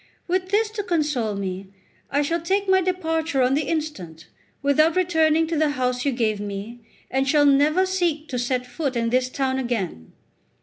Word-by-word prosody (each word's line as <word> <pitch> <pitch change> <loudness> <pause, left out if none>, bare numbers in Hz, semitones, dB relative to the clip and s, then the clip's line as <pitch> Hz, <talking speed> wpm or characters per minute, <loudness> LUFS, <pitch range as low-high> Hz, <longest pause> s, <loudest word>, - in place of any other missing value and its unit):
With 370 +1 -1
this 425 +2 +1
to 430 -1 -4
console 295 - 0
me, 190 -1 -4 0.4
I 285 +1 +1
shall 335 +3 -1
take 390 +4 0
my 380 0 +4
departure 325 -6 0
on 250 +1 +2
the 290 0 0
instant, 190 - -4 0.4
without 310 +3 +3
returning 325 -3 +3
to 325 +1 -3
the 310 0 +2
house 250 0 -1
you 280 - +2
gave 220 -4 0
me, 205 +3 -6 0.3
and 270 +1 +1
shall 295 0 +4
never 295 +6 +4
seek 345 -5 -1
to 250 - -2
set 245 +1 0
my - - -16
foot 275 -2 -3
in 230 -1 0
this 255 0 +1
town 265 0 -1
again." 200 - -3
285 Hz, 185 wpm, -23 LUFS, 245-330 Hz, 0.4 s, my